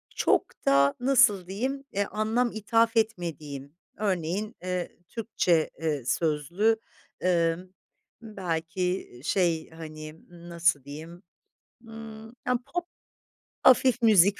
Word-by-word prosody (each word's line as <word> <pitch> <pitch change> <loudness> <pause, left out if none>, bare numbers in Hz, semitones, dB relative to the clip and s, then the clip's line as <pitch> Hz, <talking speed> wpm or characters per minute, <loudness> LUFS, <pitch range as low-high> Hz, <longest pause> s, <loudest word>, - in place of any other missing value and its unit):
çok - - +3 0.2
da 140 0 +4
nasıl 245 -8 +4
diyeyim, 260 +8 -3
eee, 200 +1 0
anlam 225 +3 0
ithaf 225 +2 +2
etmediğim. 155 - -2 0.2
Örneğin, 200 +2 -1
eee, 180 -1 -3
Türkçe, 185 -8 +1
eee, 150 -6 -1
sözlü, 170 - +1 0.5
ımm, 175 +1 +1 0.5
belki 180 -3 -2
i - - -16
şey, 170 -3 +1
hani, 155 -1 -9 0.3
nasıl 170 -5 +2
diyeyim, 160 +6 -9 0.6
ımm, 225 -1 -9 0.2
ya, 250 -1 +2 0.2
pop, 350 0 0 0.8
hafif 255 -1 +5
müzik, 200 -3 +6
185 Hz, 105 wpm, -27 LUFS, 160-220 Hz, 0.8 s, müzik